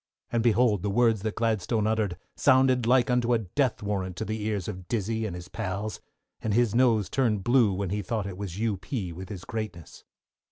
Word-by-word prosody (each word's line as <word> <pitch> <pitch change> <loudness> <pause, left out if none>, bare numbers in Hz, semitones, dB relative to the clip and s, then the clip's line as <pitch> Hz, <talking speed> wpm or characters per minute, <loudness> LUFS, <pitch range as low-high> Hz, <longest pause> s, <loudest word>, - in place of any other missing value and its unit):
And, 115 - +1
behold 115 -3 +3
the 100 - -1
words 115 0 +3
that 110 0 -3
Gladstone 110 -1 0
uttered 110 -5 0 0.2
sounded 130 -3 +4
like 125 0 +4
unto 125 -1 +2
a - - +4
death 115 +3 -1
warrant 95 -3 -2
to 110 - -4
the 110 0 -3
ears 105 -4 -2
of 90 -1 -6
Dizzey 110 0 -1
and 90 - -5
his 90 0 -8
pals, 105 0 -4 0.4
and 105 -2 0
his 120 -3 +3
nose 115 -4 +3
turned 110 -7 0
blue 120 -2 +4
when 95 -1 -2
he 105 +1 -1
thought 110 +1 -2
it 100 -2 -5
was 95 -2 -6
U. 110 -2 0
P. 90 -1 -4
with 95 +2 -8
his 95 -4 -7
greatness. 105 -8 -6
110 Hz, 205 wpm, -27 LUFS, 100-115 Hz, 0.4 s, sounded